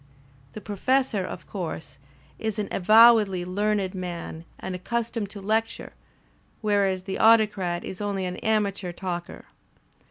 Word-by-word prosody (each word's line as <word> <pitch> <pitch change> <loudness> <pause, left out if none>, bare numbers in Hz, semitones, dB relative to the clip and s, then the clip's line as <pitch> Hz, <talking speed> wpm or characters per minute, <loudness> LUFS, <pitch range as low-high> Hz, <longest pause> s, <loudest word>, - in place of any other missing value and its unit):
The 215 - -8
Professor, 215 +1 0
of - - -7
course, 165 -7 -6 0.4
is 220 -1 -2
an 210 -1 -2
avowedly 215 -2 +5
learned 200 0 0
man 175 -3 -6
and 190 - -5
accus 235 +6 -2
tomed 215 -4 -3
to 200 -1 -9
lecture, 220 +3 -1 0.7
whereas 200 -3 +1
the 190 0 -4
Autocrat 210 -6 +3
is 190 - -7
only 200 -2 -2
an 180 0 -4
amateur 205 -4 0
talker. 175 -1 -6
200 Hz, 130 wpm, -25 LUFS, 185-215 Hz, 0.7 s, avowedly